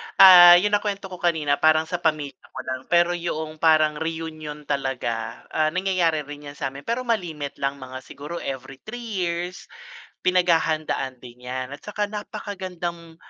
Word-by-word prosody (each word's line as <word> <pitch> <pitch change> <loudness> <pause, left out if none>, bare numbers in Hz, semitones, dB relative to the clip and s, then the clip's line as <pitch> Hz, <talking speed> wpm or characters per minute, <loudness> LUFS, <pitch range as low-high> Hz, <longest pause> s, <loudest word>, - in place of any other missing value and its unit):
ah, 175 -2 +10
yung 205 +4 +3
na-kwento 205 -2 -1
ko 180 - -8
kanina, 155 -5 +1
parang 155 0 +4
sa 175 +2 -4
pamilya 150 -5 -1
ko - - -10
lang, 130 - -3
pero 175 0 +4
'yong 160 -3 -4
parang 155 -2 +4
reunion 160 -2 -5
talaga, 130 -5 -3
ah, 155 0 +2
nangyayari 180 -5 +1
rin 145 0 -10
yan 145 - -9
samin, 140 0 -6
pero 235 +2 -1
ma-limit 170 - -3
lang, 140 0 -1
mga 130 -1 -8
siguro 145 +6 -8
every 135 0 -6
3 240 - -8 0.2
years, 175 +1 -3 0.5
pinag-hahandaan 160 -6 +1
din 125 0 -12
yan, 130 +1 -4
at 140 - -8
saka 210 0 -3
napaka-gandang 185 -6 -6
160 Hz, 155 wpm, -24 LUFS, 140-180 Hz, 0.5 s, ah